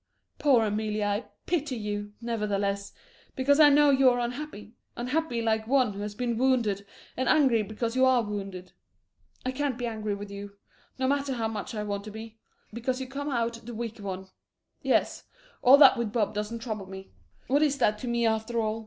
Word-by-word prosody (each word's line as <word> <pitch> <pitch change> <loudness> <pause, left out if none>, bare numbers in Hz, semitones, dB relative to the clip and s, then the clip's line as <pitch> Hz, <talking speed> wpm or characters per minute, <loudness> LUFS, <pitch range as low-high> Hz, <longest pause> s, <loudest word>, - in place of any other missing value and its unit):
Poor 255 -6 +4
Amelie, 215 0 -1
I 205 +2 -1 0.2
pity 305 -6 -1
you, 205 -2 -4
nevertheless, 205 -3 -2 0.4
because 280 +3 +3
I 300 -1 +9
know 290 0 +5
you 270 -1 +5
are 245 - +1
unhappy, 240 -3 -5 0.2
unhappy 250 -1 -1
like 220 -1 0
one 255 -4 +3
who 195 - -8
has 205 0 -5
been 235 0 -2
wounded, 230 -7 +1 0.3
and 260 - 0
angry 265 -7 +4
because 225 +3 -3
you 260 - +3
are 260 -2 +4
wounded. 195 -3 -6 0.7
I 255 - 0
can't 270 -1 -2
be 245 - -3
angry 215 -3 -3
with 200 0 -8
you, 200 0 -8 0.4
no 260 0 0
matter 280 0 0
how 225 -2 -1
much 220 +1 -5
I 210 - -2
want 200 -1 -3
to 215 - -7
be 220 +1 -10 0.3
because 250 +3 -2
you 265 - -4
come 280 +3 -5
out 235 -3 -2
the 235 0 -8
weaker 230 -1 -5
one. 190 -1 -6 0.5
Yes, - - +1 0.4
all 260 +3 +8
that 295 - +8
with 230 -3 -1
Bob 215 -2 0
doesn't 210 +2 -4
trouble 215 -5 -4
me. 190 0 -10 0.3
What 280 +3 +2
is 290 -2 +2
that 210 -5 +2
to 250 - -6
me, 235 0 +1
after 220 +1 0
all? 220 0 -1
230 Hz, 195 wpm, -28 LUFS, 210-260 Hz, 0.7 s, I